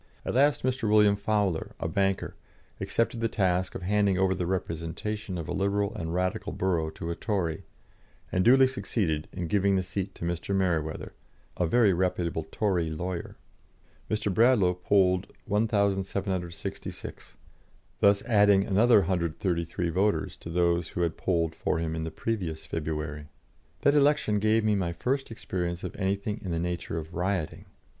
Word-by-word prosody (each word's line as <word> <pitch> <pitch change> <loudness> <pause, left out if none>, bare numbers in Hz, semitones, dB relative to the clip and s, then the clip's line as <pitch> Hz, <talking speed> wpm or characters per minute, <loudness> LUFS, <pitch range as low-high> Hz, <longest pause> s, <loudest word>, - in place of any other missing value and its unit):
At - - -2
last 140 +3 +3
Mr. 125 -3 0
William 105 -1 +5
Fowler, 100 -4 -1
a - - -2
banker, 95 +3 0 0.5
accepted 115 0 0
the 115 - +2
task 95 -3 0
of - - -5
handing 100 0 +2
over 95 0 +3
the 90 -2 -2
representation 95 +3 -3
of 85 - -5
a - - -3
Liberal 100 +1 0
and 85 -7 -4
Radical 95 +4 -1
borough 85 -4 0
to 85 - -4
a - - -3
Tory, 85 -7 -2 0.7
and 90 - +2
duly 130 +4 +7
succeeded 95 -11 -1
in 90 -2 -4
giving 100 +3 +2
the 95 - +1
seat 95 +1 -4
to - - -6
Mr. 85 +3 -2
Mereweather, 85 -5 -1 0.4
a 90 - 0
very 110 0 +4
reputable 85 -3 -1
Tory 90 -6 0
lawyer. 85 +3 -4 0.7
Mr. 105 -2 0
Bradlaugh 110 -5 +4
polled 90 +1 +2
1,766, 100 -4 -2 0.6
thus 100 0 +4
adding 100 -3 +4
another 105 +2 +5
133 85 -1 -1
voters 100 +5 0
to - - -9
those 85 0 +1
who 90 - -4
had 85 -2 0
polled 85 -3 0
for 80 - -1
him 80 -1 -2
in 80 0 -3
the - - -3
previous 90 -6 -3
February. 75 -2 -4 0.5
That 140 - +4
election 145 -7 +3
gave 110 +1 +3
me 110 -1 +3
my 90 -4 0
first 135 +10 -1
experience 90 -5 -4
of - - -5
anything 100 +2 -2
in 95 - -5
the 85 - -1
nature 85 -1 -3
of 80 +1 -6
rioting. 90 -2 -2
95 Hz, 155 wpm, -28 LUFS, 85-105 Hz, 0.7 s, duly